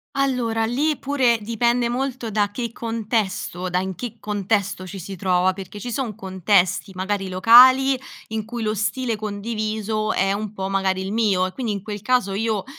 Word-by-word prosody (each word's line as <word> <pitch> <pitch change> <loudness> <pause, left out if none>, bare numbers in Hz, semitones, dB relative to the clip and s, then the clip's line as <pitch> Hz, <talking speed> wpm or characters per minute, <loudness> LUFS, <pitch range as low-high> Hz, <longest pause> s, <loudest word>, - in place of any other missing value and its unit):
Allora, 250 -5 0
lì 290 +5 0
pure 260 -4 +2
dipende 235 +2 +1
molto 250 -2 -3
da 205 -1 +1
che 235 +2 -4
contesto, 220 -5 -2
da 180 - 0
in 190 0 -3
che 235 +3 -6
contesto 200 -2 -1
ci 190 +1 -8
si 195 +2 -7
trova, 185 0 +2
perché 195 +1 -9
ci 245 +3 -5
son 235 -6 -3
contesti, 190 -1 +1
magari, 190 +1 -2
locali, 255 +8 +7 0.3
in 220 -1 -3
cui 235 +1 -5
lo 215 0 0
stile 230 +3 -1
condiviso 215 0 -2
è 195 +1 +1
un 210 0 -3
po' 190 -2 -4
magari 190 -1 0
il 190 +2 -4
mio, 205 -5 +2
e 185 - -6
quindi 245 -1 -3
in 200 -2 -3
quel 210 -2 -6
caso 245 -3 +1
io 215 0 -1
215 Hz, 180 wpm, -22 LUFS, 195-235 Hz, 0.3 s, locali